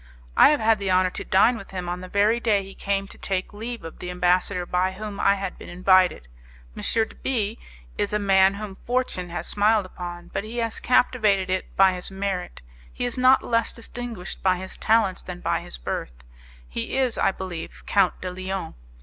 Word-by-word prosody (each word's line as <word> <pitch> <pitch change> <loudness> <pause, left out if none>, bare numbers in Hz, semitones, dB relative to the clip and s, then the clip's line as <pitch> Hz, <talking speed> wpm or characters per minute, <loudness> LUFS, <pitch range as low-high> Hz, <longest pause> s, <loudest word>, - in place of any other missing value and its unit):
"I - - +8
have 300 -1 +3
had 220 -1 +3
the 200 -1 -2
honour 185 0 +3
to - - -5
dine 225 +6 +4
with 195 - -11
him 180 -2 -5
on 175 +1 -3
the 185 - -7
very 210 +5 +2
day 210 -4 +2
he 195 0 -11
came 195 0 -2
to - - -14
take 190 +1 -2
leave 230 +3 -6
of 165 - -9
the 180 - -6
ambassador 180 +1 +1
by 180 +1 0
whom 210 +1 -7
I 200 - +4
had 195 -2 -5
been - - -10
invited. 185 - +3 0.5
M. - - -7
de 225 -1 0
B 225 -4 -1 0.4
is 205 - 0
a 210 - +2
man 195 -1 +4
whom 205 -1 -6
fortune 240 -5 -2
has 175 - -4
smiled 210 0 +3
upon, 175 -1 -8
but 195 - -2
he 225 +3 -7
has 230 -1 -2
captivated 210 -7 +2
it 185 - 0
by 190 -1 +6
his 180 0 -3
merit; 190 - -4 0.3
he 245 - -3
is 245 - -2
not 255 +1 +5
less 230 -1 +1
distinguished 230 -4 -7
by 185 -1 +3
his 190 +1 -7
talents 220 -4 +2
than 180 -1 -8
by - - 0
his - - -4
birth; - - -5 0.4
he 65 - -4
is, 260 -3 +2
I - - +4
believe, 185 -3 -7
Count 195 -3 +2
de 185 - -4
Lyon. 185 +1 -4
195 Hz, 205 wpm, -24 LUFS, 185-220 Hz, 0.5 s, I